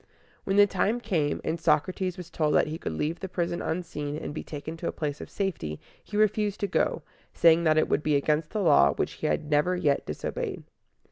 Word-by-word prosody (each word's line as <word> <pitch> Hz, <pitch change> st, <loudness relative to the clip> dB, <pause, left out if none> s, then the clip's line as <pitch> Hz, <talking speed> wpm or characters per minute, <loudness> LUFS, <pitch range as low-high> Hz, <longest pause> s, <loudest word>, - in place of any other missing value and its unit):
When 195 Hz, -, 0 dB
the 205 Hz, -, +8 dB
time 205 Hz, +4 st, 0 dB
came, 165 Hz, -11 st, 0 dB
and 165 Hz, +1 st, -2 dB
Socrates 175 Hz, +4 st, +1 dB
was 175 Hz, -1 st, -9 dB
told 150 Hz, -2 st, +1 dB
that -, -, +5 dB
he 155 Hz, +2 st, -5 dB
could -, -, -4 dB
leave 155 Hz, -, -2 dB
the 190 Hz, -, -5 dB
prison 175 Hz, -1 st, -2 dB
unseen, 150 Hz, -3 st, -3 dB
and 150 Hz, -, -5 dB
be 155 Hz, -, -4 dB
taken 150 Hz, +2 st, -6 dB
to 170 Hz, -, -4 dB
a -, -, 0 dB
place 150 Hz, -2 st, -4 dB
of -, -, -8 dB
safety, 160 Hz, -, -3 dB, 0.2 s
he 210 Hz, -, -5 dB
refused 210 Hz, -1 st, +2 dB
to 200 Hz, -, +1 dB
go, -, -, 0 dB, 0.3 s
saying 165 Hz, 0 st, +5 dB
that 155 Hz, -1 st, +4 dB
it 155 Hz, -, +3 dB
would -, -, +1 dB
be 150 Hz, -1 st, +1 dB
against 150 Hz, +2 st, +1 dB
the 210 Hz, -, -2 dB
law, 155 Hz, -5 st, +5 dB
which -, -, -1 dB
he 155 Hz, -, -3 dB
had 150 Hz, 0 st, -1 dB
never 150 Hz, +5 st, +3 dB
yet 145 Hz, -6 st, +1 dB
disobeyed. 75 Hz, -, -4 dB
160 Hz, 220 wpm, -27 LUFS, 150-185 Hz, 0.3 s, the